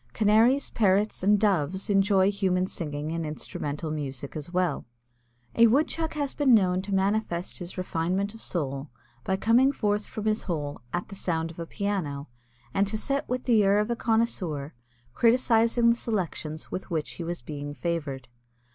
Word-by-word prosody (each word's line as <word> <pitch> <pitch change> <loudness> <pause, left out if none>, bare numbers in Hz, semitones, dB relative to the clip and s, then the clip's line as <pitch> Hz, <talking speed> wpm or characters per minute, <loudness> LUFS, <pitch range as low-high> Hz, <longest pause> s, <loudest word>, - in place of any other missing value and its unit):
Canaries, 225 +6 +3
Parrots, 205 -1 +2
and 205 +2 +4
Doves 190 -2 +1
enjoy 195 -1 +3
human 185 -2 +1
singing 150 -4 -4
and 165 0 -2
instrumental 150 0 -4
music 140 -2 -5
as 155 +2 -6
well. 180 -5 0 0.7
A 230 - +6
Woodchuck 315 +6 +1
has 285 -2 -1
been 270 -5 +5
known 185 -3 +2
to 200 +1 -7
manifest 190 -2 -1
his 175 0 -7
refinement 185 +3 -1
of 225 - -12
soul 140 -4 -2 0.3
by 190 - 0
coming 240 +7 +4
forth 210 -5 -1
from 215 - -6
his 215 0 +1
hole 145 -6 -3
at 175 - -3
the 195 - -8
sound 165 -3 -2
of 165 - -13
a 165 - -5
piano 165 -10 -3 0.4
and 195 +1 +2
to 215 +2 -2
sit 275 +5 -2
with 250 0 -1
the 225 -4 +4
air 200 +1 +4
of 210 +3 +1
a - - +1
connoisseur 195 -12 -1 0.4
criticising 235 - +4
the - - +2
selections 175 -9 -3
with 185 - -5
which 160 -4 -2
he 170 - -6
was 170 -5 -4
being 145 +1 -6
favored. 145 -7 -3
190 Hz, 170 wpm, -27 LUFS, 160-220 Hz, 0.7 s, A